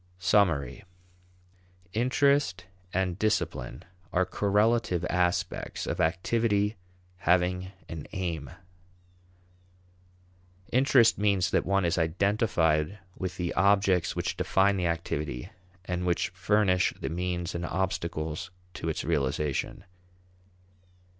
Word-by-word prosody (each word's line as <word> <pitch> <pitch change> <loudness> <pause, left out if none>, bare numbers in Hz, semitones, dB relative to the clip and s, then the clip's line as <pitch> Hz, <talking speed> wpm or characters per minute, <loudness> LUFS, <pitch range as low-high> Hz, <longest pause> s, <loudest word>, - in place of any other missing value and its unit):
Summary. 90 -8 +2 1.1
Interest 125 -5 +2 0.3
and 90 0 -1
discipline 85 - -1 0.3
are 95 +1 +2
correlative 105 -1 +1
aspects 90 0 -1
of - - -2
activity 105 +5 +1 0.4
having 90 +1 +1 0.2
an 80 -3 -7
aim. 85 -7 -3 2.2
Interest 125 -4 +4
means 100 -3 +2
that - - +1
one 100 -1 +2
is 85 +1 +1
identified 85 -1 +1 0.2
with 95 -1 -5
the 90 -1 -2
objects 100 -3 +3
which - - -2
define 100 +1 +3
the 90 -2 0
activity 75 -6 -3 0.3
and 90 -1 -2
which 90 -1 0
furnish 95 0 +2
the - - -3
means 90 +1 -2
and 85 - -4
obstacles 85 -4 -2 0.2
to 80 - -4
its 80 - -2
realization. 70 0 -1
90 Hz, 100 wpm, -28 LUFS, 85-100 Hz, 2.2 s, Interest